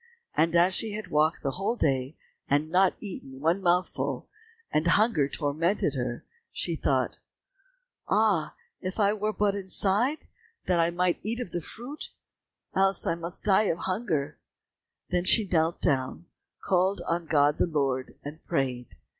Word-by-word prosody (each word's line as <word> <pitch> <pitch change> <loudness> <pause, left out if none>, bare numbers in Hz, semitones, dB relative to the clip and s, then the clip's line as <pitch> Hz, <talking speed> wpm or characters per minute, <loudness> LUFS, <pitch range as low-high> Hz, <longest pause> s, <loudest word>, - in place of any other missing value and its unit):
And 165 +2 +2
as 175 +2 +5
she 220 +3 0
had 215 +1 -6
walked 155 +2 +2
the 135 - 0
whole 195 - -1
day 135 - 0 0.3
and 145 +3 +1
not 185 +1 +4
eaten 135 -10 -8
one 165 +6 +1
mouthful, 170 -7 0 0.4
and 155 +2 +1
hunger 170 - +3
tormented 160 +7 0
her, 125 -3 -4 0.3
she - - -1
thought, - - 0 0.9
"Ah, 205 -8 +2 0.3
if 185 +3 -4
I 205 0 +4
were 215 0 -1
but 205 0 +1
inside, 200 +8 +1 0.4
that 180 -2 +2
I 165 0 +3
might 175 +1 0
eat 230 +3 -3
of 245 -8 -5
the 175 - -2
fruit, 245 - -7 0.6
else 195 -1 +2
must 170 +4 -2
I 205 +2 +5
die - - +1
of 165 - 0
hunger!" 180 -7 -2 0.7
Then 175 - +1
she 215 +3 +5
knelt 165 -1 +1
down, 135 +4 0 0.4
called 185 0 +1
on 170 0 -1
God 145 -1 +3
the - - +3
Lord, 135 -5 -1
and 150 +3 -9
prayed. 130 -6 -1
175 Hz, 155 wpm, -27 LUFS, 150-195 Hz, 0.9 s, as